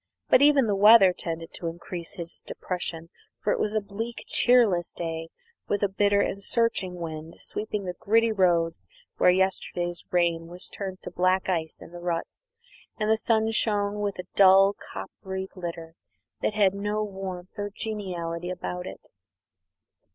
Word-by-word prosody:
But - - +6
even 285 -3 +6
the 205 -2 +1
weather 200 -2 +8
tended 165 -1 -5
to 170 - -5
increase 170 0 -6
his 170 -3 -6
depression, 170 -2 -4 0.3
for 205 - +1
it - - -2
was 210 0 -1
a - - +4
bleak, 220 +4 -6
cheerless 225 -9 +4
day, 165 -1 -4 0.4
with 205 0 0
a - - +4
bitter 200 +1 +2
and 200 - -2
searching 200 -5 0
wind 160 -1 -6
sweeping 210 -1 -4
the 180 - -3
gritty 225 +2 +3
roads 175 -5 +1 0.3
where - - +5
yesterday's 180 -2 0
rain 170 -2 +1
was 175 +1 -7
turned 190 -2 -6
to - - -7
black 185 +1 +1
ice 160 -3 -2
in - - -13
the 175 - -9
ruts, 175 - -4 0.5
and 215 0 +1
the - - +6
sun 220 0 +1
shone 210 -2 +1
with 205 -1 -2
a 180 - -6
dull 195 0 +7
coppery 190 - -7
glitter 170 -3 -7 0.5
that 215 - 0
had 200 -3 +4
no 205 +2 -1
warmth 190 -3 -6
or 205 0 -3
geniality 180 -5 -4
about 180 0 -5
it. - - -11
190 Hz, 160 wpm, -26 LUFS, 175-205 Hz, 0.5 s, weather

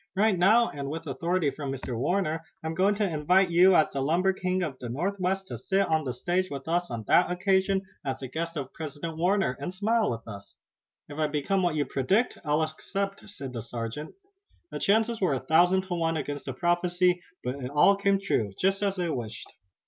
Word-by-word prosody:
Right 205 +1 +3
now, 215 +7 +4
and 140 -1 -5
with 160 +3 -5
authority 165 +2 0
from 140 0 -5
Mr. 130 -2 -5
Warner, 160 +4 0 0.2
I'm 160 0 -2
going 195 +4 +2
to 205 0 +1
invite 180 +3 +2
you 180 +2 +6
as 155 - +4
the 135 - -2
lumber 175 +7 +2
king 185 0 -1
of 140 -6 -4
the 120 - -6
Northwest 190 +7 -1
to 120 - -5
sit 195 +9 +1
on 160 -2 +1
the 130 - -1
stage 175 +9 -1
with 140 0 -7
us 175 +2 0
on 115 -2 -4
that 175 - +5
occasion, 190 +1 +1 0.2
as 135 -2 -2
the 130 - -5
guest 165 +4 -4
of 135 -2 -5
President 160 +1 -6
Warner, 180 -3 +1
and 145 +6 -4
smile 215 +4 +1
with 115 -1 -5
us." 100 -2 -10 0.5
"If 145 +1 -8
I 155 - +2
become 155 +7 0
what 175 -3 +1
you 145 -2 +1
predict 190 - 0
I'll 150 0 +1
accept," 195 +6 -4
said 140 -10 -7
the 115 - -4
sergeant. 115 +5 -6 0.6
The - - -4
chances 220 +2 +2
were 175 -8 +2
a - - -2
thousand 175 +7 +4
to 185 -1 -5
one 165 -1 0
against 145 -1 -4
the 135 - -3
prophecy, 175 +3 +1 0.2
but 130 +2 -4
it 125 - -3
all 150 +8 +5
came 200 0 +2
true, 110 - -1
just 195 +1 +1
as 200 -1 0
they 180 -2 -1
wished. 120 -6 -6
170 Hz, 210 wpm, -27 LUFS, 140-190 Hz, 0.6 s, you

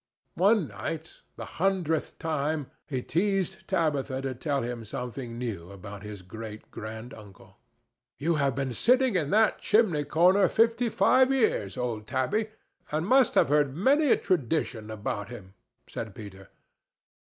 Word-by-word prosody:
One 195 -2 +3
night—the 155 +11 -7 0.2
hundredth 180 -5 0
time—he 150 -4 -3
teased 190 +1 -1
Tabitha 145 -7 0
to 135 -1 -2
tell 140 +1 -2
him 120 -1 -4
something 120 +2 -6
new 105 -9 -5
about 100 +1 -9
his 105 -2 -8
great 110 +3 -9
granduncle. 110 -3 -10 0.6
"You 165 +4 +1
have 140 -1 +1
been 135 -2 -2
sitting 250 - +3
in 155 -5 +1
that 215 +3 +3
chimney 200 -10 +3
corner 180 +6 +4
fifty 230 +4 +2
five 255 +6 +4
years, 220 - +1
old 115 -3 -3
Tabby, 170 - 0 0.4
and 155 +2 -1
must 260 +5 +4
have - - +4
heard 145 -2 +2
many 280 - +3
a - - +5
tradition 125 -8 -1
about 105 0 -4
him," 100 -6 -10 0.3
said 110 -4 -6
Peter. 95 -3 -11
140 Hz, 135 wpm, -28 LUFS, -, 0.6 s, a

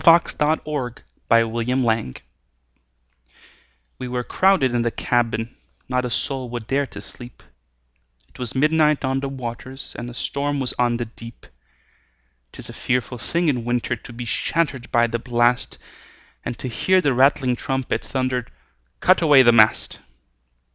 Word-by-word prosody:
W 165 0 +9
X. 170 - 0
Y 150 +1 +3
Z - - -15 0.4
Ballad - - -20 0.4
of 115 -1 -5
the 115 0 -1
Tempest 115 - 0 1.8
WE 130 - -4
were 125 0 -2
crowded 185 -6 +3
in 120 - +1
the 120 - +1
cabin, 115 -1 -1 0.3
Not 125 -1 0
a - - -2
soul 130 0 -2
would 120 -2 -5
dare 135 +4 0
to - - -10
sleep, 120 -1 -9 0.9
It - - -19
was 125 0 -5
midnight 150 +1 +3
on 130 0 0
the 140 0 -3
waters, 130 0 -7
And 120 +1 -6
a 120 - -10
storm 145 +2 -2
was 130 -2 -2
on 120 -1 +2
the 120 - -3
deep. 115 0 -12 1.1
'Tis - - -9
a - - -8
fearful 125 0 -2
thing 170 +9 0
in 125 -6 +1
winter 120 0 -1
To 120 - -12
be 120 0 -7
shattered 135 +2 -1
by 120 0 +4
the 115 0 -2
blast, 120 0 +1 0.7
And 120 - -4
to - - -5
hear 185 +9 +2
the 145 -7 +2
rattling 130 0 +3
trumpet 130 -1 -2
Thunder, 130 -2 -2 0.5
"Cut 185 0 +4
away 145 -5 +7
the 120 - +6
mast!" 110 -2 +3
125 Hz, 165 wpm, -22 LUFS, 120-140 Hz, 1.8 s, W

